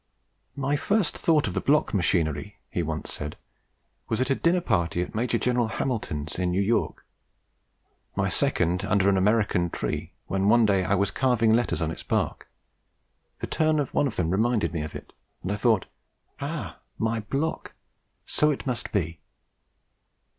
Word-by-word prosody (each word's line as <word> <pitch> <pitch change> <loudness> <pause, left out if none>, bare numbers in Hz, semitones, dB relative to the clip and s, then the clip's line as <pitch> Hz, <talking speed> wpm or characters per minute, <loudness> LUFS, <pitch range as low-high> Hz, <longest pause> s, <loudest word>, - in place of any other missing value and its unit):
"My 140 +1 0
first 190 +1 +1
thought 155 -3 +2
of - - -3
the - - -1
block 150 +2 +2
machinery," 85 -1 0
he - - -1
once - - -4
said, 75 0 -5 0.7
"was 110 - 0
at 130 +1 +1
a - - +4
dinner 170 +5 +2
party 90 - 0
at - - -8
Major 120 +2 0
General 120 -1 +1
Hamilton's, 100 - -3
in 90 -1 +1
New 90 +2 0
York; 110 +4 0 1.1
my - - +1
second 90 +3 +1
under 100 -1 +3
an 100 - +3
American 95 -3 +2
tree, 80 +1 -3
when, 95 +1 +1
one 120 0 +6
day 100 -2 +3
that 90 - -3
I 100 - +4
was 100 +1 +1
carving 120 -4 +3
letters 120 -7 +1
on 80 - -1
its - - -7
bark, - - -2 0.9
the - - -1
turn 155 -1 +1
of 145 - -2
one 145 - +3
of 120 - -5
them 85 -2 0
reminded 105 -4 +1
me 80 - -1
of 75 0 -6
it, - - -9 0.3
and 95 - -2
I - - 0
thought, 110 -2 +2 0.5
'Ah! - - -5 0.2
my 115 0 0
block! 140 +9 -3 0.5
so 150 - +2
it 145 - -2
must 125 -3 -3
be.' 85 -5 -1
105 Hz, 175 wpm, -26 LUFS, 90-125 Hz, 1.1 s, one